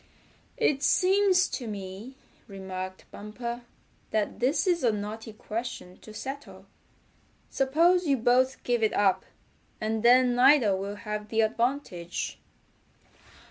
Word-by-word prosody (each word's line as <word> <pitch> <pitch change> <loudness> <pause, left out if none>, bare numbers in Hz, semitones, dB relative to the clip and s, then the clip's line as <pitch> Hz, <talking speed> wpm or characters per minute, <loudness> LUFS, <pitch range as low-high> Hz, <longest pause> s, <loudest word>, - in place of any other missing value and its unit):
"It 295 - +1
seems 375 +2 +3
to 245 - -5
me," 200 +4 -7 0.3
remarked 190 -2 -7
Bumper, 235 +3 -6 0.5
"that 210 -1 -1
this 265 - +1
is 350 -4 +1
a 235 - +4
knotty 215 +2 -5
question 215 -3 -6
to 215 - -13
settle. 270 +6 -8 0.9
Suppose 335 +6 +2
you 275 -2 +3
both 255 +3 +2
give 240 -1 0
it 220 - +2
up, 195 -2 +2 0.5
and 220 0 -2
then 245 +1 +5
neither 250 -5 +5
will 200 +2 -4
have 210 0 -6
the 225 0 +2
advantage." 220 -6 -2
235 Hz, 120 wpm, -27 LUFS, 210-270 Hz, 0.9 s, then